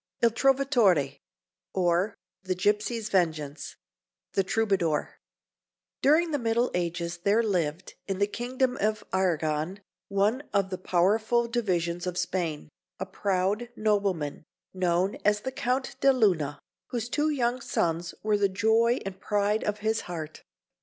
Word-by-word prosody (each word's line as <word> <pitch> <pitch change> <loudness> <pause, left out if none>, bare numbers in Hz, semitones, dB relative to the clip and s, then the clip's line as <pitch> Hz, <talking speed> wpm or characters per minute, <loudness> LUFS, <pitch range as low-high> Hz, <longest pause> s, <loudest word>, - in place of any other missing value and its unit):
IL 235 - +6
TROVATORE, 230 - +3 0.6
OR, 180 +2 +2 0.3
THE 185 -1 -2
GIPSY'S 210 +4 0
VENGEANCE 155 -6 -1 0.6
(The 195 - +2
Troubadour) 190 -7 0 0.8
During 320 +4 +4
the 290 - 0
Middle 235 +1 +1
Ages 170 0 -2
there 205 +6 +3
lived, 175 -4 -1
in 195 -1 -2
the 200 - +3
kingdom 250 +4 -1
of 215 +1 0
Arragon 165 -1 0 0.3
one 205 +6 +1
of 195 -1 +2
the 185 - -3
powerful 215 +7 +2
divisions 180 -7 -1
of 180 -1 -3
Spain 175 -4 -2 0.3
a - - -2
proud 200 +4 -1
nobleman, 200 -10 0 0.3
known 185 +1 +1
as 210 0 +3
the 260 - -3
Count 255 +1 -1
de 275 - +5
Luna, 175 - +2 0.3
whose 240 -2 -3
two 295 +5 +1
young 250 -3 0
sons 170 -4 -1
were 210 -1 +2
the 200 -1 +3
joy 225 +4 +3
and 195 -1 -6
pride 210 +1 +1
of 210 0 -2
his 220 +1 +1
heart. 160 -3 -6
200 Hz, 135 wpm, -28 LUFS, 175-230 Hz, 0.8 s, IL